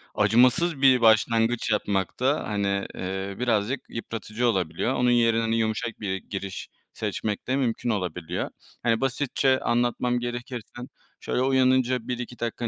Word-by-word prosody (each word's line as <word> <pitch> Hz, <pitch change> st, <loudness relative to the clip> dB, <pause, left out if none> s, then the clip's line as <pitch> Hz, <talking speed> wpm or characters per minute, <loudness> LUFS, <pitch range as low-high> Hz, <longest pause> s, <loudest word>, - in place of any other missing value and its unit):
acımasız 125 Hz, -, +3 dB
bir 130 Hz, -3 st, +6 dB
başlangıç 115 Hz, +1 st, +3 dB
yapmak 100 Hz, -3 st, -1 dB
da, 135 Hz, +4 st, +1 dB
hani, 100 Hz, -1 st, -1 dB
eee, 95 Hz, +1 st, -4 dB
birazcık 120 Hz, +1 st, 0 dB
yıpratıcı 115 Hz, +1 st, -3 dB
olabiliyor, 95 Hz, +2 st, 0 dB
onun 125 Hz, -1 st, +2 dB
yerine 115 Hz, -1 st, +3 dB
hani 115 Hz, 0 st, 0 dB
yumuşak 110 Hz, +1 st, -2 dB
bir 95 Hz, -3 st, -2 dB
giriş 95 Hz, 0 st, -6 dB, 0.2 s
seçmek 105 Hz, -2 st, -3 dB
de 130 Hz, -, +1 dB
mümkün 120 Hz, -3 st, -1 dB
olabiliyor. 90 Hz, -4 st, -2 dB, 0.3 s
Hani 115 Hz, +1 st, +2 dB
basitçe 135 Hz, 0 st, +1 dB
anlatmam 120 Hz, +1 st, 0 dB
gerekirse, 120 Hz, -1 st, -5 dB, 0.5 s
şöyle, -, -, -1 dB
uyanınca 130 Hz, -2 st, +2 dB
1-2 125 Hz, -1 st, -5 dB
dakika 120 Hz, 0 st, -2 dB
115 Hz, 135 wpm, -25 LUFS, 105-125 Hz, 0.5 s, bir